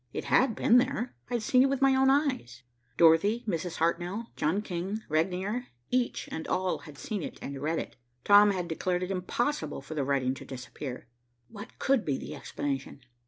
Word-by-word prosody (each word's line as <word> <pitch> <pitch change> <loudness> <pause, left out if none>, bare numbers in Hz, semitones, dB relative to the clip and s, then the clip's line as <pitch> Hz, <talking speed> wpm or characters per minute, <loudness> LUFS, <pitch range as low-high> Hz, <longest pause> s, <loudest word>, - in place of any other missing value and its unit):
It - - -3
had 255 -4 +3
been 245 - +5
there. 255 -1 -1 0.2
I 245 - -1
had 235 - -1
seen 255 +3 +4
it 270 - +4
with 275 -1 0
my 270 -1 +5
own 265 0 +4
eyes. 255 - 0 0.3
Dorothy, 185 +8 +5
Mrs. 175 -2 -2
Hartnell, 175 +7 -1
John 175 +8 0
King, 190 +4 -4
Regnier, 190 +9 -1 0.2
each 250 -1 0
and 160 - -5
all 185 0 0
had 150 -3 -12
seen 205 +7 -4
it - - -6
and 140 -1 -6
read 160 +3 0
it. - - -5 0.3
Tom 205 0 +7
had 185 -3 -1
declared 180 +2 -1
it 180 - -3
impossible 240 +10 -1
for 140 +3 -8
the 150 -3 -1
writing 135 -2 +1
to - - -9
disappear. 130 0 -7 0.4
What 205 -1 -10
could 270 -4 +2
be 140 -3 -1
the - - -7
explanation? 140 -1 -4
185 Hz, 190 wpm, -29 LUFS, 155-235 Hz, 0.4 s, Tom